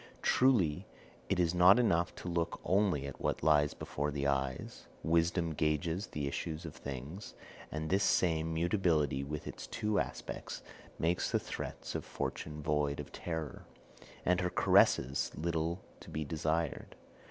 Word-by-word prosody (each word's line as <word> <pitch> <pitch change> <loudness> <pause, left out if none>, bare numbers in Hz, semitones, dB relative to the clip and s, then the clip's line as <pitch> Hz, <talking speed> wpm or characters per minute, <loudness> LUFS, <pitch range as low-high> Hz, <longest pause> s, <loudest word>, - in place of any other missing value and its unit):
Truly 105 - +3 0.4
it 95 -2 +1
is 85 -1 +3
not 90 +4 +7
enough 85 -8 +2
to - - -8
look 85 -1 -1
only 95 -7 +2
at 70 - -7
what - - -1
lies 75 -1 +4
before 75 +1 -2
the 70 -1 -2
eyes; 70 -2 -2 0.2
wisdom 85 0 +2
gauges 80 +6 0
the 75 -2 -3
issues 80 +4 -4
of 80 - -6
things, 70 +7 -7 0.4
and 80 +1 -3
this 95 +4 +2
same 80 -2 +2
mutability, 80 -5 +1
with 75 +1 -5
its - - -7
two 105 -3 0
aspects, - - -5 0.3
makes 85 +2 +1
the - - +2
threats - - -5
of - - -3
Fortune 75 -1 -4
void 75 -1 +1
of 75 - -6
terror, 80 -4 -5 0.6
and 90 +1 +3
her 90 - +1
caresses 65 -5 +3
little 85 +2 -1 0.2
to - - -12
be 75 0 -3
desired. 80 +1 -1
80 Hz, 150 wpm, -33 LUFS, 75-90 Hz, 0.6 s, not